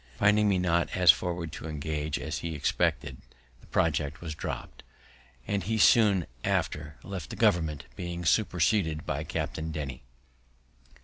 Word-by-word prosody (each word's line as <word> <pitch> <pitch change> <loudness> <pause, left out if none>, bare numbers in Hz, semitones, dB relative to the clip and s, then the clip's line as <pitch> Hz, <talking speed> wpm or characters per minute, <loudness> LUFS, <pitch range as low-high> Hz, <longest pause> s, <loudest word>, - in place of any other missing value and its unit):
Finding 105 +1 +4
me 95 - +3
not 85 -1 +1
so 90 - -1
forward 85 -2 +4
to 80 - -7
engage 75 0 -3
as - - -4
he 85 -1 -4
expected, 75 - 0 0.4
the - - -20
project 75 -2 0
was 80 -3 -5
dropt, 75 - -6 0.6
and 100 -1 -1
he 110 +2 0
soon 105 -5 +5 0.2
after 75 -1 -1
left 95 -5 -6
the - - -6
government, 80 -4 +1
being 85 -2 -5
superseded 85 -4 +2
by - - -2
Captain 80 +1 -3
Denny. 70 -4 -5
85 Hz, 140 wpm, -28 LUFS, 75-95 Hz, 0.6 s, soon